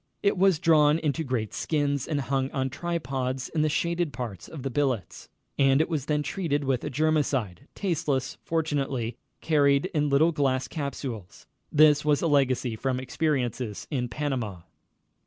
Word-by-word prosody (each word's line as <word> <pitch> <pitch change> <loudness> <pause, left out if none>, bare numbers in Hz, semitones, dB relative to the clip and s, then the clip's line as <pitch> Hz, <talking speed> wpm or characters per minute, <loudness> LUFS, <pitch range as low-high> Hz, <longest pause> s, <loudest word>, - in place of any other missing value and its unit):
It 200 - +3
was 190 -2 +4
drawn 155 -3 +4
into 160 0 -1
great 125 -6 -2
skins 145 -3 -1
and 145 -3 -1
hung 135 0 -1
on 130 -1 -2
tripods 135 -6 -3
in 155 - 0
the 155 - +2
shaded 170 +1 0
parts 115 -10 -6
of 150 -5 -8
the 135 - -2
billets, 130 -7 -2 0.3
and 135 0 +5
it 160 - +1
was 150 -4 -2
then 150 -1 +1
treated 145 -3 -1
with 135 -3 0
a - - -2
germicide, 140 - 0
tasteless 155 -9 -1
fortunately, 140 -7 -1 0.2
carried 145 +2 +3
in 150 -2 +1
little 150 +4 +4
glass 135 -4 0
capsules. 135 - -6 0.3
This 150 -1 +5
was 150 0 +2
a - - +3
legacy 130 -5 +2
from 130 +3 -1
experiences 130 -5 -2
in 125 -4 -1
Panama. 120 - -3
140 Hz, 155 wpm, -27 LUFS, 130-155 Hz, 0.3 s, and